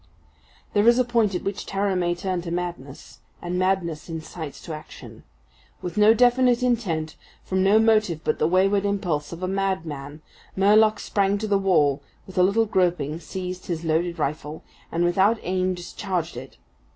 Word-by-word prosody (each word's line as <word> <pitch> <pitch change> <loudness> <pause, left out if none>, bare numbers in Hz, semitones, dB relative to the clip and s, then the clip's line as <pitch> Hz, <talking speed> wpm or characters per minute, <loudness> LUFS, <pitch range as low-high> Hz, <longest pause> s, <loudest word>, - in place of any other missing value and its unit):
There 205 +2 +3
is 235 +1 +6
a 255 - +3
point 230 -5 +1
at - - -3
which 195 +1 -4
terror 195 0 0
may 175 -1 0
turn 180 0 -3
to 170 - -6
madness; 170 -6 -6 0.2
and 175 +1 -3
madness 180 -4 -1
incites 160 -2 -7
to 165 - -7
action. 155 0 -11 0.6
With 180 - -5
no 210 +1 +6
definite 245 0 +3
intent, 180 -11 -1 0.3
from 190 0 -1
no 195 +3 +5
motive 215 -7 +2
but - - -1
the 155 - +3
wayward 195 +3 +2
impulse 180 -8 -1
of 170 +2 -7
a - - 0
madman, 160 -7 -3 0.3
Murlock 215 +3 +4
sprang 200 0 0
to 215 +1 -4
the 200 -1 +2
wall, 150 -8 +2 0.2
with 190 - -13
a 180 - +3
little 200 +5 +3
groping 175 -6 0
seized 180 +1 -6
his 170 -2 -3
loaded 170 +2 0
rifle, 150 0 -4 0.3
and 170 +1 0
without 190 +6 +3
aim 185 0 0
discharged 175 -2 -4
it. 130 +2 -10
185 Hz, 170 wpm, -24 LUFS, 165-200 Hz, 0.6 s, is